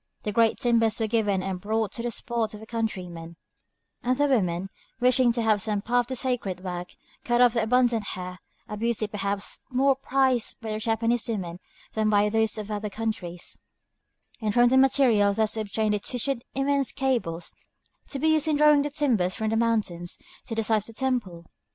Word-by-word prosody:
The 210 - -2
great 225 +1 +3
timbers 230 -3 +2
were 225 - +1
given 210 -4 +1
and 185 -1 -4
brought 220 +1 -1
to - - -5
the 240 - -2
spot 235 -1 -2
by - - -7
the 220 - -11
countrymen; 180 -8 -4 0.7
and 255 +1 0
the 290 - +3
women, 195 -8 0 0.3
wishing 250 0 +4
to 235 -1 -1
have 215 -2 +3
some 210 -1 -2
part 245 +1 +1
in - - -2
the - - -2
sacred 230 -8 -2
work, 180 -1 -5 0.3
cut 240 0 +1
off 245 -2 +6
their 230 -2 +1
abundant 240 -1 +3
hair, 180 0 -7 0.3
a 210 - -5
beauty 230 0 0
perhaps 200 -1 -3
more 270 +1 +3
prized 260 -3 0
by 225 -2 -5
the 215 - -2
Japanese 230 +1 0
women 180 -6 -3 0.3
than 215 -1 +1
by 210 0 +3
those 220 +1 +1
of 215 0 -5
other 210 0 -3
countries, 190 -5 -4 0.8
and 215 -2 -1
from 240 0 +6
the 260 - +4
material 250 -7 +4
thus 220 0 +1
obtained 215 0 -1
they 210 - 0
twisted 245 +3 -2
immense 275 0 +1
cables, 235 -11 -2 0.5
to 280 - -5
be 315 +4 +2
used 315 -1 +2
in 310 - +2
drawing 300 -1 +6
the 290 - -1
timbers 245 - +1
from 220 0 -1
the - - +1
mountains 215 -7 0 0.3
to 230 - -5
the 225 - 0
site 215 -1 +2
of - - -19
the 230 - -11
temple. 220 -10 -2
225 Hz, 195 wpm, -26 LUFS, 205-245 Hz, 0.8 s, off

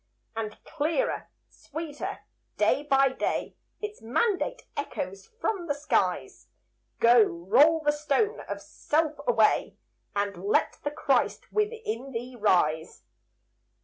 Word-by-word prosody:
And 215 -1 -4
clearer, 320 +10 -1 0.2
sweeter, 315 -2 -6 0.3
day - - +3
by 275 -2 +4
day, 260 - -2 0.2
Its 420 0 -6
mandate 400 - 0
echoes 195 -9 -4
from 370 -6 -1
the 285 - 0
skies, 290 - -1 0.5
"Go 235 0 +7
roll 235 - +4
the 295 -1 +3
stone 300 - 0
of - - -4
self 310 0 0
away, 225 -3 +3 0.4
And 200 -3 -2
let 200 - +1
the 290 - 0
Christ 295 - 0
within 425 - -2
thee 245 +2 -5
rise." 175 -8 +1
285 Hz, 115 wpm, -28 LUFS, 220-330 Hz, 0.5 s, Go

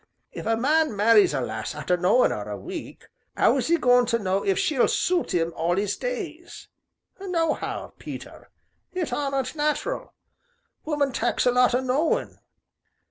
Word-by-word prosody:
If - - -7
a 225 0 +2
man 300 +1 +2
marries 210 0 +5
a 140 -3 -1
lass 110 +3 -4
arter 150 +4 0
knowin' 185 +8 +3
'er - - -5
a - - -4
week - - -8 0.3
'ow - - +4
is - - -1
'e 340 - +4
goin' 245 -4 +4
to 230 -1 +2
know 195 -2 -1
if 390 - +1
she'll 310 -10 +2
suit 350 - 0
'im 165 -1 0
all 170 +2 0
'is 205 0 0
days? 365 -10 -6 0.5
Nohow, 340 -5 -2
Peter, - - -9 0.4
it 365 -4 -2
aren't 275 -2 -1
nat'ral 300 +11 -2 0.7
woman 295 -3 0
tak's 240 - 0
a 250 - +5
lot 250 0 +3
o' 250 - +1
knowin'. 265 +5 0
255 Hz, 160 wpm, -25 LUFS, 205-320 Hz, 0.7 s, marries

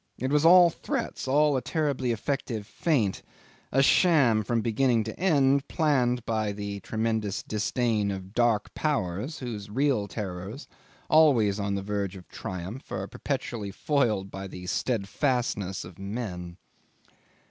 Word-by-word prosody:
It 130 +1 -2
was 150 +1 +3
all 175 0 +8
threats, - - -4
all 145 +2 +3
a 130 - 0
terribly 140 -6 -1
effective 115 -2 -3
feint, 115 - 0 0.5
a 135 +1 +4
sham 140 -10 +4
from 115 +2 0
beginning 115 0 +2
to 110 0 -7
end, 140 -6 +3
planned 125 -7 +1
by 110 -2 -1
the 100 0 -5
tremendous 110 -2 -2
disdain 110 -1 0
of 95 -1 -4
the 95 - -14
Dark 120 -1 +1
Powers 135 - -2
whose 110 -5 -6
real 125 -2 +1
terrors, 100 - -6 0.4
always 120 -11 +4
on 100 0 -1
the 100 - -3
verge 100 -1 -2
of 90 -2 -12
triumph, 95 +5 -7
are - - -3
perpetually 120 -7 -4
foiled 105 -5 0
by 95 0 -6
the 90 -1 -9
steadfastness 105 - -1
of 90 +1 -13
men. 95 -4 -5
115 Hz, 140 wpm, -27 LUFS, 100-135 Hz, 0.5 s, all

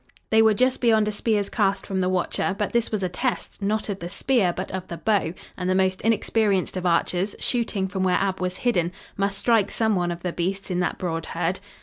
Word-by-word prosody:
They 220 0 +6
were 220 -1 +5
just 255 +3 +2
beyond 220 -3 +4
a - - 0
spear's 210 -1 0
cast 200 -3 +1
from 190 -1 -1
the 180 - +1
watcher, 185 +1 0
but 205 -1 -2
this 235 -1 +2
was 210 -3 -1
a - - +2
test, 240 +5 -3
not 210 +2 0
of 200 -2 -3
the 170 - -5
spear, 230 -4 +2
but 185 +2 -5
of 185 0 -5
the 170 - -6
bow, 200 -6 +1 0.2
and 180 0 -3
the 185 - +2
most 190 0 +1
inexperienced 215 -4 +1
of 180 -1 -1
archers, 180 +3 +1
shooting 225 -6 0
from 190 0 -3
where 185 -1 +3
Ab 195 -1 -1
was 185 0 -2
hidden, 180 -7 +2 0.2
must 200 0 0
strike 210 -1 +3
some 220 -2 +1
one 175 -1 0
of 170 0 -6
the 180 -2 -2
beasts 190 +3 -2
in 180 - 0
that 180 - 0
broad 165 -3 -3
herd. 175 +2 -1
195 Hz, 235 wpm, -24 LUFS, 180-215 Hz, 0.2 s, They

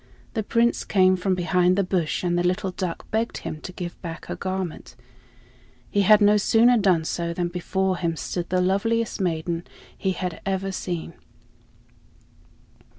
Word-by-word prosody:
The 220 - 0
Prince 230 +3 +1
came 185 -2 +4
from 185 +1 0
behind 180 0 +2
the 200 - +3
bush 180 -4 -1
and 175 -1 +1
the 175 - +2
little 185 +2 0
duck 180 -2 -4
begged 225 +1 -1
him 155 - -6
to 180 - -7
give 175 -1 -7
back 165 -2 -7
her - - -5
garment. 185 -3 -4 1.0
He 205 - +3
had 210 +2 +6
no 205 +1 +6
sooner 230 +4 +5
done 185 -7 +3
so 170 +1 -2
than 175 0 -1
before 185 +1 -1
him 170 -2 -1
stood 175 +2 -4
the 185 0 +2
loveliest 220 +4 0
maiden 170 -1 -1 0.3
he 190 - -1
had 180 -1 -4
ever 195 0 -1
seen. 175 -3 -4
185 Hz, 160 wpm, -24 LUFS, 175-200 Hz, 1.0 s, had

